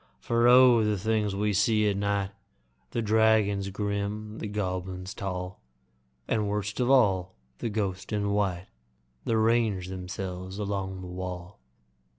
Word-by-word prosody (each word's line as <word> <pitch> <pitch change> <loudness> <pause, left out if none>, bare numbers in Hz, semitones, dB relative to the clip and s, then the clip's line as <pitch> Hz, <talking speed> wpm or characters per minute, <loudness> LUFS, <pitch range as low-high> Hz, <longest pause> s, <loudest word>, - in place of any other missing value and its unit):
For 115 - +2
O! 125 -2 +7
the 105 -1 +1
things 105 0 0
we 105 +1 0
see 105 +2 +3
at 100 - +1
night 100 -1 -1 0.6
The 115 - -2
dragons 105 -2 +3
grim, 105 +2 -3
the - - -4
goblins 95 -2 -4
tall, 90 -1 -5 0.7
And, 105 -2 0
worst 105 +1 -3
of 125 0 +1
all, 95 -9 +3 0.2
the 115 - -2
ghosts 100 -3 -3
in 100 -1 0
white 95 -3 0 0.6
That 115 - +1
range 110 -5 +2
themselves 95 0 -6
along 95 -2 -3
the 90 - -7
wall! 90 -2 -6
100 Hz, 140 wpm, -28 LUFS, 95-110 Hz, 0.7 s, O